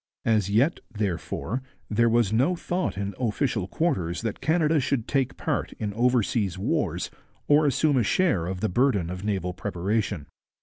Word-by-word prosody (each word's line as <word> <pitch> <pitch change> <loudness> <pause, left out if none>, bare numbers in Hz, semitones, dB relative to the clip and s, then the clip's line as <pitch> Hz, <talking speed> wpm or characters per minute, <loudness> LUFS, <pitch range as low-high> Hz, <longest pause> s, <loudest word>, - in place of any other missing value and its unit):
As 110 -4 +2
yet, 120 +11 +2
therefore, 105 +4 -2 0.3
there 115 +2 +3
was 115 -3 +2
no 135 +11 +3
thought 175 - -2
in 100 0 -3
official 115 -4 0
quarters 95 - -1
that 115 -3 -3
Canada 155 +1 +3
should 130 -3 -1
take 135 -3 0
part - - -2
in 105 -2 -4
oversea 115 -2 +2
wars 95 - -1 0.4
or 150 +1 +5
assume 145 +1 +2
a 120 - +3
share 105 - +2
of 95 0 -4
the 110 - +2
burden 100 -5 +2
of 90 +1 -6
naval 95 -4 -1
preparation. 95 -1 -2
110 Hz, 160 wpm, -26 LUFS, 100-135 Hz, 0.4 s, or